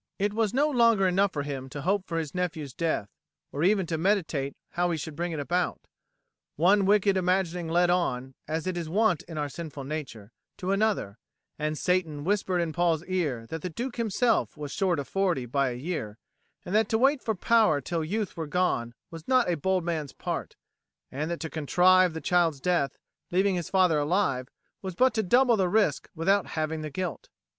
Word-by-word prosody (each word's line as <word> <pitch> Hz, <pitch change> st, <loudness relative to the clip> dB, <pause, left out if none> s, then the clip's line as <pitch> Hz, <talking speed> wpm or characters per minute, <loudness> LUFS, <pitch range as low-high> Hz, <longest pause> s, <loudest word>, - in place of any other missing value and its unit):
It 205 Hz, +1 st, 0 dB
was 220 Hz, -2 st, +1 dB
no 280 Hz, +5 st, +2 dB
longer 230 Hz, -8 st, +4 dB
enough 190 Hz, +2 st, +2 dB
for 145 Hz, -4 st, -3 dB
him 135 Hz, -2 st, -5 dB
to 140 Hz, +1 st, -7 dB
hope 195 Hz, +1 st, 0 dB
for 165 Hz, -, -3 dB
his 155 Hz, -4 st, -3 dB
nephew's 165 Hz, -7 st, -3 dB
death, 160 Hz, -10 st, -1 dB, 0.4 s
or 145 Hz, -, -2 dB
even 195 Hz, 0 st, +3 dB
to 160 Hz, -1 st, -3 dB
meditate 160 Hz, -7 st, 0 dB
how 175 Hz, 0 st, 0 dB
he 165 Hz, -, -1 dB
should 155 Hz, 0 st, -6 dB
bring 175 Hz, +2 st, -2 dB
it 160 Hz, -, -3 dB
about. 175 Hz, +5 st, -1 dB, 0.7 s
One 190 Hz, +5 st, +4 dB
wicked 200 Hz, -1 st, +4 dB
imagining 180 Hz, -2 st, 0 dB
led 175 Hz, +2 st, +3 dB
on, 130 Hz, -7 st, -1 dB
as 160 Hz, +2 st, -2 dB
it 185 Hz, -1 st, -2 dB
is 165 Hz, -2 st, -4 dB
wont 200 Hz, -2 st, +2 dB
in 165 Hz, -2 st, -7 dB
our 150 Hz, -1 st, -1 dB
sinful 145 Hz, -2 st, -7 dB
nature, 135 Hz, -8 st, -6 dB, 0.3 s
to 185 Hz, +1 st, -2 dB
another, 195 Hz, -, 0 dB, 0.4 s
and 155 Hz, 0 st, -1 dB
Satan 165 Hz, -5 st, 0 dB
whispered 190 Hz, -1 st, +1 dB
in 165 Hz, -2 st, -2 dB
Paul's 170 Hz, -2 st, +1 dB
ear 155 Hz, -11 st, -1 dB
that 160 Hz, -1 st, -5 dB
the 180 Hz, -, -3 dB
Duke 245 Hz, +8 st, -5 dB
himself 230 Hz, -3 st, +1 dB
was 145 Hz, -2 st, -6 dB
short 185 Hz, -3 st, +1 dB
of 140 Hz, -2 st, -4 dB
forty 180 Hz, -9 st, 0 dB
by 135 Hz, +2 st, +1 dB
a 120 Hz, -, -4 dB
year, 125 Hz, -7 st, -4 dB, 0.5 s
that 215 Hz, +5 st, +1 dB
to 220 Hz, -, +2 dB
wait 270 Hz, +3 st, +3 dB
for 220 Hz, -, -1 dB
power 215 Hz, -6 st, +3 dB
till 165 Hz, +4 st, -3 dB
youth 205 Hz, +4 st, -2 dB
were 160 Hz, -2 st, -4 dB
gone 145 Hz, -8 st, 0 dB, 0.2 s
was 165 Hz, -1 st, -10 dB
not 255 Hz, -7 st, +3 dB
a -, -, +1 dB
bold 185 Hz, +3 st, 0 dB
man's 160 Hz, -4 st, -3 dB
part, -, -, -4 dB, 0.6 s
and 150 Hz, +4 st, -3 dB
that 170 Hz, -, -3 dB
to 160 Hz, -, -3 dB
contrive 180 Hz, +3 st, +4 dB
the 160 Hz, -, -4 dB
child's 170 Hz, -5 st, +2 dB
death, 145 Hz, -4 st, 0 dB, 0.3 s
leaving 190 Hz, +2 st, +2 dB
his 175 Hz, -3 st, -3 dB
father 180 Hz, -5 st, +3 dB
alive, 145 Hz, -5 st, 0 dB, 0.3 s
was 190 Hz, -2 st, -5 dB
but 255 Hz, +4 st, +4 dB
to 220 Hz, -, +1 dB
double 240 Hz, +4 st, +4 dB
the 185 Hz, -3 st, +1 dB
risk 205 Hz, -8 st, +1 dB
without 195 Hz, +4 st, +2 dB
halving 155 Hz, 0 st, -2 dB
the 155 Hz, -, -4 dB
guilt. 180 Hz, +1 st, -5 dB
175 Hz, 200 wpm, -27 LUFS, 155-195 Hz, 0.7 s, longer